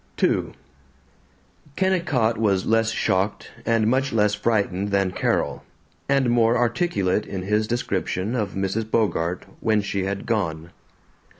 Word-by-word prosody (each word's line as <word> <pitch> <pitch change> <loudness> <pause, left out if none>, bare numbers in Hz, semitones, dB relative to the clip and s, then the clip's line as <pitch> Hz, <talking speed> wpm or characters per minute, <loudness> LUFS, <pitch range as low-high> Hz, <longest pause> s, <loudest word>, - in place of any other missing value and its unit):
II - - +1 1.2
Kennicott 165 -12 +1
was 100 -4 +1
less 115 0 +2
shocked 100 -2 -1 0.2
and 115 -2 +3
much 130 +4 +1
less 105 -2 +2
frightened 105 -3 0
than 100 -2 +1
Carol, - - -1 0.5
and 135 -3 +3
more 120 0 +3
articulate 115 - 0
in 95 -2 -4
his 105 +2 +1
description 105 -2 -2
of 105 -5 -2
Mrs. 95 +3 -2
Bogart, 90 -6 0
when 110 -1 +2
she 100 -1 -2
had 100 0 -3
gone. 85 -7 -2
105 Hz, 125 wpm, -23 LUFS, 95-115 Hz, 1.2 s, and